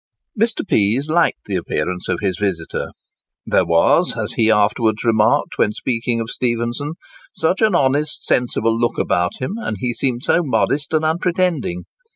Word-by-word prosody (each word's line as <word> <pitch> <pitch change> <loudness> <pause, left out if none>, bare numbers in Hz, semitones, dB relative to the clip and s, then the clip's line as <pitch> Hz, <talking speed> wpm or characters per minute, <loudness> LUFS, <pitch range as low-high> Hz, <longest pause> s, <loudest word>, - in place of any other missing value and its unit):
Mr. 225 -1 0
Pease 115 - +1
liked 155 - +1
the - - -3
appearance 90 -1 -3
of - - -1
his 95 -3 -1
visitor: 95 -6 -2 0.6
"there - - +2
was," 85 0 +3
as - - -3
he 110 -1 +2
afterwards 110 +1 +2
remarked 110 -2 +2
when 105 - +3
speaking 115 -1 -2
of 115 0 -4
Stephenson, 120 +4 -2 0.4
"such 160 +6 0
an 220 -1 +3
honest, 145 +3 0
sensible 115 -2 +1
look 120 +1 0
about 90 0 0
him, 130 - -4
and 110 - -4
he 120 +1 -1
seemed 125 0 -1
so 170 - +3
modest 145 +1 0
and 155 0 +1
unpretending. 165 - 0
120 Hz, 160 wpm, -19 LUFS, 105-150 Hz, 0.6 s, was